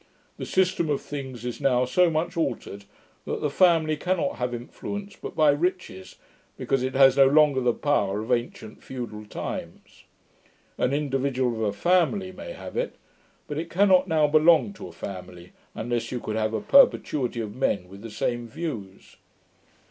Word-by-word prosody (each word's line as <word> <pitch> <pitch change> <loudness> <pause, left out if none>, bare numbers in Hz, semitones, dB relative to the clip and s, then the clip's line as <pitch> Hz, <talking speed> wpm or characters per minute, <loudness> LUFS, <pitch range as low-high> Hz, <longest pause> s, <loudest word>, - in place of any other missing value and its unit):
The - - -6
system 185 -3 +1
of 145 - +1
things 130 -5 -7
is 125 +3 -5
now 125 -2 +3
so 180 +7 +3
much 165 +2 -2
altered, 100 -10 -3 0.4
that - - -3
the 150 - -1
family 165 -2 +3
cannot 180 -5 -1
have 125 0 -2
influence 200 +12 -7
but - - -8
by 155 -2 +5
riches, 145 - -3 0.4
because 135 - 0
it 130 +1 -2
has 135 0 +6
no 135 -1 +7
longer 145 -1 +4
the 125 -1 +3
power 105 -8 0
of 110 - -5
ancient 120 -2 -3
feudal 115 -5 -7
times. - - -7 0.7
An 125 - +1
individual 135 -3 0
of 110 - -5
a 105 -2 +1
family 180 - +1
may - - -8
have - - -9
it; - - -2 0.5
but 150 0 -4
it 165 +1 -5
cannot 185 0 +4
now 160 -3 +3
belong 160 +6 +4
to 190 - -9
a - - -11
family, 90 0 -9 0.2
unless 120 +1 -3
you 125 - -3
could 110 -2 -4
have 110 0 -1
a 110 - -2
perpetuity 145 - +3
of 105 -2 -4
men 105 -8 0
with 100 +2 -12
the 115 - -8
same 120 +2 -2
views. 115 - -7
135 Hz, 170 wpm, -25 LUFS, 115-165 Hz, 0.7 s, no